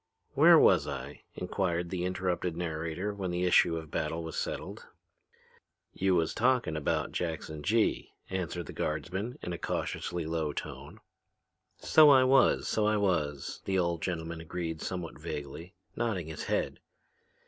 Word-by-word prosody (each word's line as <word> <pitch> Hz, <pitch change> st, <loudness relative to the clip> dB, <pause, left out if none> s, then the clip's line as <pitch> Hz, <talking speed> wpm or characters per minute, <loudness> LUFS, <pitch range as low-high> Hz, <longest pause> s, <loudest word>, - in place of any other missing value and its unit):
"Where -, -, +8 dB
was -, -, +5 dB
I?" -, -, -6 dB
inquired 90 Hz, -2 st, -2 dB
the 90 Hz, -2 st, -2 dB
interrupted 90 Hz, -2 st, -2 dB
narrator 85 Hz, +3 st, -3 dB
when 95 Hz, -2 st, -4 dB
the 90 Hz, +1 st, -1 dB
issue 85 Hz, -2 st, +4 dB
of 80 Hz, -2 st, -8 dB
battle 85 Hz, +1 st, -2 dB
was 80 Hz, -, -6 dB
settled. -, -, -4 dB, 1.1 s
"You 95 Hz, -1 st, +2 dB
was 80 Hz, -2 st, +1 dB
talking 120 Hz, -9 st, +2 dB
about 75 Hz, -2 st, -1 dB
Jackson 80 Hz, -2 st, -4 dB
Gee," 110 Hz, +7 st, +1 dB, 0.2 s
answered 90 Hz, -2 st, -3 dB
the -, -, -9 dB
guardsman 100 Hz, +8 st, -3 dB
in 90 Hz, -, -3 dB
a 85 Hz, -, -5 dB
cautiously 85 Hz, -2 st, -3 dB
low 80 Hz, -2 st, -2 dB
tone. -, -, -7 dB, 0.8 s
"So 155 Hz, -1 st, +6 dB
I 135 Hz, -2 st, +7 dB
was, 130 Hz, +1 st, +4 dB
so 105 Hz, -1 st, +1 dB
I 105 Hz, 0 st, +2 dB
was," 80 Hz, -8 st, -1 dB
the 95 Hz, -1 st, 0 dB
old 85 Hz, -2 st, 0 dB
gentleman 80 Hz, -2 st, -3 dB
agreed 80 Hz, -1 st, -4 dB
somewhat 90 Hz, -3 st, -5 dB
vaguely, 80 Hz, +6 st, -7 dB, 0.2 s
nodding 105 Hz, -9 st, -2 dB
his 80 Hz, -, -6 dB
head. -, -, -1 dB
90 Hz, 150 wpm, -30 LUFS, 80-95 Hz, 1.1 s, Where